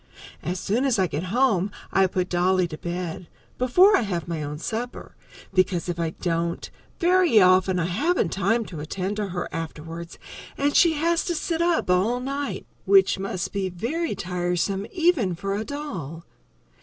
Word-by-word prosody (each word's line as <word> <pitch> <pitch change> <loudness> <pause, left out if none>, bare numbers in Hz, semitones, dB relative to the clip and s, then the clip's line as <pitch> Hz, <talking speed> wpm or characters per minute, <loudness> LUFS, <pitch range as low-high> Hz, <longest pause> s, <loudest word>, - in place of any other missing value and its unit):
As 180 +2 -3
soon 220 +7 0
as 265 -4 +2
I 190 - +3
get 165 0 -3
home 210 -2 +2 0.2
I 195 0 +4
put 180 0 -1
Dolly 185 0 +2
to 155 - -7
bed, 175 0 -5 0.3
before 360 - +5
I - - +3
have 180 -7 -3
my 165 -2 -3
own 150 0 -4
supper, 230 +9 -5 0.4
because 185 -2 +1
if 175 -1 -3
I 165 -1 0
don't, 170 0 -2 0.3
very 355 - +4
often 185 0 +4
I 170 - 0
haven't 230 - +1
time 225 +4 +1
to 165 -6 -8
attend 185 +6 -3
to 210 -1 -1
her 175 -1 -4
afterwards 165 +1 -6 0.4
and 285 +1 +1
she 335 -2 +6
has 335 +3 +1
to 350 -3 -1
sit 330 +1 -1
up 340 - +2
all 210 +7 +2
night, 275 +2 -4 0.2
which 390 - +5
must 190 -2 -3
be 195 -2 -1
very 235 - -2
tiresome 180 +2 -1
even 320 - +2
for 195 +3 -3
a 210 - -2
doll. 185 - -6
190 Hz, 170 wpm, -24 LUFS, 175-260 Hz, 0.4 s, she